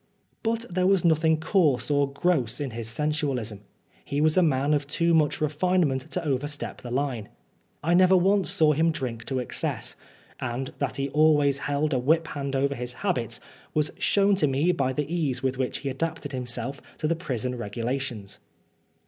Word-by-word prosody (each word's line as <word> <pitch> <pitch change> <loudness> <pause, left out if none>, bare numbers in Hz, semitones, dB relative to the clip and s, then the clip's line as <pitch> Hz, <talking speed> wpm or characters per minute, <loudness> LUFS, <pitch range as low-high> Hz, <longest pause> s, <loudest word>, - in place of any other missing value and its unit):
But 230 +1 -1
there 185 -1 +1
was 195 -3 +3
nothing 160 -1 +3
coarse 155 -6 +2
or 140 -1 +2
gross 140 -6 +1
in 140 -3 -3
his 115 0 -4
sensualism. 135 -6 -1 0.4
He 140 - -2
was 155 +1 +3
a 185 - +5
man 145 -3 +2
of 145 -1 0
too 170 +3 +1
much 155 -2 +3
refinement 155 -2 +1
to 180 0 -3
overstep 145 +1 -3
the 120 - -7
line. 125 -4 -2 0.5
I 165 +3 +2
never 185 +1 +6
once 190 -2 +3
saw 155 -2 +4
him 160 +3 +2
drink 125 -7 -4
to 135 - -2
excess; 125 - -2 0.4
and 130 +1 -4
that 140 -3 -1
he 140 0 -2
always 145 -2 +4
held 145 +1 0
a 130 - +2
whiphand 145 -1 0
over 140 +1 +1
his 125 -1 -4
habits 120 - -1 0.4
was 150 -1 +1
shown 200 0 +3
to 150 - +3
me 140 +6 +2
by 135 -6 0
the 145 +3 -1
ease 150 -6 -1
with 130 0 -1
which 130 - -1
he - - +1
adapted 145 +1 -3
himself 125 +1 -4 0.2
to 155 - -1
the 165 - +1
prison 125 -7 -3
regulations. 120 -1 -4
145 Hz, 175 wpm, -26 LUFS, 130-160 Hz, 0.5 s, never